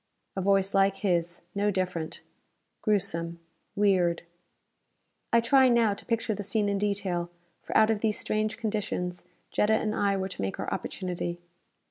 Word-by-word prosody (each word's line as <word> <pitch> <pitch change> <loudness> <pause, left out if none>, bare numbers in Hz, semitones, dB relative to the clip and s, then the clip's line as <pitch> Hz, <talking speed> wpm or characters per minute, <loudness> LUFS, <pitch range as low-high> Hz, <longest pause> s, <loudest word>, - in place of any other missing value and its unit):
A 190 - -1
voice 195 0 +2
like 195 0 +3
his: 170 -2 0
no 205 +1 +1
different. 180 -4 -2 0.6
Gruesome. 170 -5 0 0.4
Weird. 185 -4 +2 1.1
I 235 - +6
try 260 +3 +5
now 230 -3 +4
to 200 - -11
picture 230 -1 0
the 205 - -4
scene 205 +1 0
in 200 -1 0
detail, 190 -4 -1 0.3
for - - 0
out 220 0 +5
of 215 - 0
these 215 -1 +1
strange 215 0 -1
conditions 205 -5 -3 0.3
Jetta 215 +1 +3
and 215 -1 0
I 200 -2 +1
were 190 0 -2
to 185 - -6
make 95 0 -3
our - - -2
opportunity. 175 -1 -4
200 Hz, 155 wpm, -28 LUFS, 180-215 Hz, 1.1 s, I